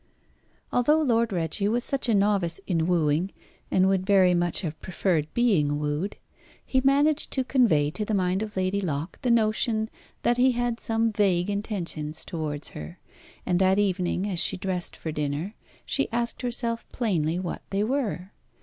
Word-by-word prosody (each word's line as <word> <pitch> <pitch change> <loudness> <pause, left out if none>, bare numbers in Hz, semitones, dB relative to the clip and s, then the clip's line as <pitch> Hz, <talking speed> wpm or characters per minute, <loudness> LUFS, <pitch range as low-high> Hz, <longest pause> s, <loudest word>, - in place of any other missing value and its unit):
Although 300 +6 +4
Lord 235 -4 +2
Reggie 180 +3 -1
was 235 +3 0
such 270 -3 -1
a 225 - +4
novice 195 -4 +1
in 165 -3 0
wooing, 170 +1 +1 0.4
and 185 0 +3
would 190 -1 +2
very 190 -2 +5
much 175 -1 +1
have 160 -4 -5
preferred 170 -4 -1
being 170 -12 +2
wooed, 150 +6 -2 0.5
he 260 - +1
managed 285 +3 +3
to 265 - +1
convey 205 - +3
to 215 - -3
the 210 0 -1
mind 185 0 +1
of 215 -2 -5
Lady 190 +2 0
Locke 155 -2 -3
the 250 - 0
notion 220 -1 +1 0.3
that 240 0 +2
he 255 +1 +4
had 240 -1 -1
some 225 0 0
vague 195 -2 +2
intentions 170 -7 -4
towards 155 -3 -4
her. 75 +3 -9 0.5
And 180 -1 +1
that 190 0 +4
evening, 190 -1 0
as 185 -4 -2
she - - 0
dressed 185 -1 -3
for 160 - -4
dinner, 150 +6 -2 0.3
she 275 - -1
asked 235 +1 -2
herself 235 -2 -3
plainly 175 -9 0
what 180 -2 -4
they 200 +1 0
were. 215 -7 -2
195 Hz, 170 wpm, -26 LUFS, 170-230 Hz, 0.5 s, very